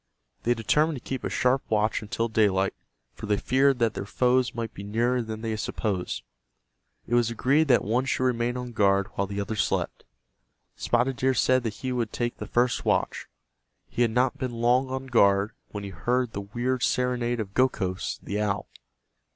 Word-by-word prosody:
They 120 +1 +1
determined 150 +8 +2
to 120 - -11
keep 130 -2 -3
a - - -1
sharp 130 +1 +2
watch 110 0 +1
until 115 +2 -2
daylight, 100 -4 +2 0.4
for 110 - -8
they 105 -1 +2
feared 135 +3 +3
that 115 -3 +1
their 100 - -5
foes 125 +2 +2
might 115 -2 -4
be - - -8
nearer 120 +5 0
than 110 -1 -6
they 110 -1 -2
supposed. 105 -3 -3 0.8
It 120 - -5
was 120 -1 +3
agreed 140 +7 +2
that 125 -3 +4
one 120 +5 +1
should 130 - 0
remain 120 -1 0
on 125 -1 -5
guard 100 -3 +2
while 100 - -2
the 100 0 -4
other 100 +2 -3
slept. - - -1 0.7
Spotted 120 +2 0
Deer 130 0 +2
said 130 0 +3
that 115 -3 -3
he 130 - 0
would 120 -3 -1
take 120 -1 -2
the - - -6
first 120 +1 +1
watch. - - 0 0.6
He - - -2
had 120 - +4
not 125 +3 +1
been 130 -2 -3
long 120 +3 +2
on 130 0 -4
guard 100 -4 +3 0.2
when 105 -1 -6
he 100 - -6
heard 125 +6 0
the 100 - -4
weird 120 +5 -2
serenade 125 -2 0
of 100 -3 -4
Gokhos, 100 -8 0
the 105 +2 -2
owl. 100 -1 -1
120 Hz, 190 wpm, -26 LUFS, 105-125 Hz, 0.8 s, that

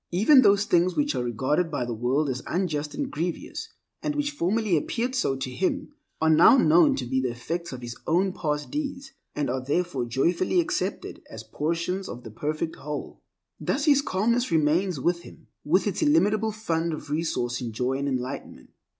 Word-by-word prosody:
Even 225 - +6
those 200 -3 +4
things 180 0 +2
which 295 0 +1
are - - -1
regarded 130 +8 0
by 145 -5 -2
the 120 - -3
world 125 +6 0
as 130 -2 -2
unjust 155 -5 -2
and - - -3
grievous 165 +3 -4 0.3
(and 300 -1 -2
which 290 0 0
formerly 215 -5 +1
appeared 235 - -1
so 260 - +1
to 130 -1 -4
him) 275 - -2 0.3
are 160 - +2
now 165 - +7
known 165 -6 +5
to 130 - -3
be 130 +2 0
the 130 - 0
effects 165 +9 -4
of 130 -2 -7
his 120 -1 -6
own 185 +3 +2
past 150 -4 -3
deeds, 280 -2 -4 0.2
and 145 -1 -1
are 130 +1 -2
therefore 145 -2 -1
joyfully 170 - +1
accepted 350 +2 -2
as - - -8
portions 170 +5 -2
of 120 - -8
the 115 - -9
perfect 155 +7 -3
whole. 150 +1 -6 0.4
Thus 280 +2 -1
his 285 -3 +5
calmness 235 +3 0
remains 165 +2 +2
with 170 +5 0
him - - -14 0.2
with - - +2
its - - -1
illimitable 220 -8 +3
fund 170 -6 -2
of 150 -1 -7
resource 140 -6 -1
in 120 -2 -4
joy 125 +4 -1
and 140 - -2
enlightenment. 130 0 -5
165 Hz, 185 wpm, -26 LUFS, 135-205 Hz, 0.4 s, now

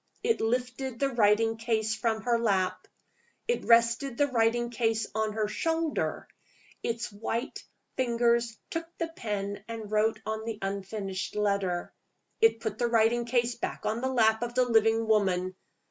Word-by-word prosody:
It 460 -1 +1
lifted 250 +2 -1
the 275 - +2
writing 225 -1 +3
case 220 -1 0
from 220 -1 -1
her 235 0 +2
lap. 195 -5 0 0.6
It 475 - 0
rested 235 +2 +3
the 290 - +4
writing 240 -2 +1
case 225 -2 0
on 220 0 -1
her 215 -1 0
shoulder. 325 +7 -1 0.5
Its 235 0 -3
white 225 +4 -4 0.3
fingers 235 -2 +1
took 330 0 -3
the 335 -1 -2
pen 205 -8 -4
and 225 -2 -6
wrote 215 +1 +2
on 220 0 -3
the 225 -1 -4
unfinished 195 0 -4
letter. 200 -4 0 0.5
It 450 - +4
put 220 -1 -3
the 240 - +2
writing 235 +1 +3
case 240 0 +1
back 235 - -5
on 220 +2 -1
the 260 - 0
lap 220 -3 +3
of 240 0 -3
the 255 0 +4
living 225 -1 +3
woman. 185 -4 +2
225 Hz, 155 wpm, -29 LUFS, 215-240 Hz, 0.6 s, the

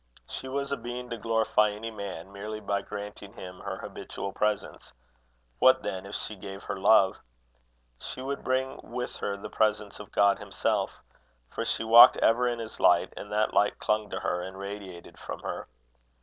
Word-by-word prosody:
She - - -6
was 140 +1 -2
a 140 - 0
being 120 +1 -6
to 115 - -2
glorify 110 -1 +3
any 110 +2 -5
man 100 -4 -7
merely 105 +2 -5
by 100 -1 -1
granting 105 0 -8
him 90 -4 -9
her - - -5
habitual 100 - -6
presence: 105 0 -2 0.7
what, - - +6
then, 95 +1 -4
if 100 - -6
she 110 - -4
gave 95 0 -8
her 100 - -3
love! 95 -1 +5 0.8
She - - -7
would 135 +2 -4
bring 130 +1 0
with 125 +1 -5
her 100 0 -2
the 100 - -7
presence 105 -2 0
of 105 - -10
God 100 -1 +4
himself, - - -1 0.5
for - - -3
she - - -1
walked 115 +1 +9
ever 120 +2 +3
in 120 -1 0
his 115 -1 -7
light, 85 -1 +4
and 105 - -8
that 105 +1 +1
light 105 - +3
clung 105 -1 0
to - - -4
her 90 - -1
and 95 +1 -7
radiated 100 -3 -8
from - - -7
her. - - -5
105 Hz, 180 wpm, -28 LUFS, 100-115 Hz, 0.8 s, walked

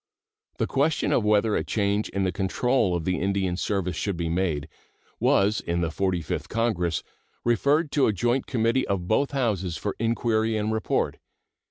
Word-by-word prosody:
The - - +1
question 145 +3 +1
whether 105 0 +2
a - - 0
change 100 0 0
in 100 - -1
the 95 - +1
control 100 +2 +1
of 85 -2 -3
the 90 0 0
Indian 95 -2 0
service 95 -1 -1
should 100 -4 -2
be 85 -1 -2
made 80 -4 -1 0.5
was 100 +2 +3
in 85 0 -1
the 85 -1 -1
Forty 90 -1 -1
fifth - - -4
Congress 90 -9 0 0.4
referred 140 +6 +2
to 140 - +3
a - - +3
joint 120 +6 0
committee 120 +1 +1
of 95 -3 -2
both 135 +8 +2
Houses 100 - -1
for 100 - -3
inquiry 115 -1 +1
and 105 +1 -1
report. 110 - 0
105 Hz, 170 wpm, -25 LUFS, 90-115 Hz, 0.5 s, was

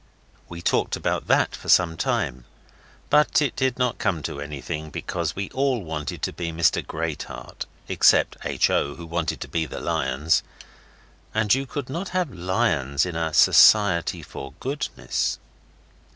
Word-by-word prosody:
We 85 0 -8
talked - - +1
about - - -2
that - - +2
for - - -9
some 85 -3 +5
time, 60 -5 -2 0.7
but 150 0 +4
it 145 -4 0
did 130 -2 0
not 125 -2 0
come 85 -5 -1
to 70 - -4
anything, 75 +2 -5
because - - -3
we 100 -1 -4
all 130 -5 0
wanted 80 -3 -5
to - - -1
be 85 -2 -4
Mr 80 +1 +2
Greatheart, 80 -1 -5 0.2
except - - +4
H. - - +1
O., 70 - 0
who 85 - -9
wanted 85 0 -2
to - - -5
be 80 -2 -1
the - - -6
lions, 65 +4 +1 0.9
and 110 -2 +3
you 135 +1 0
could 140 -1 -5
not 170 +8 -4
have 175 -9 -1
lions 85 - 0
in 90 -2 -5
a 80 -1 -1
Society 95 +1 +5
for 70 -1 -9
Goodness. 140 +3 -2
85 Hz, 155 wpm, -24 LUFS, 80-120 Hz, 0.9 s, some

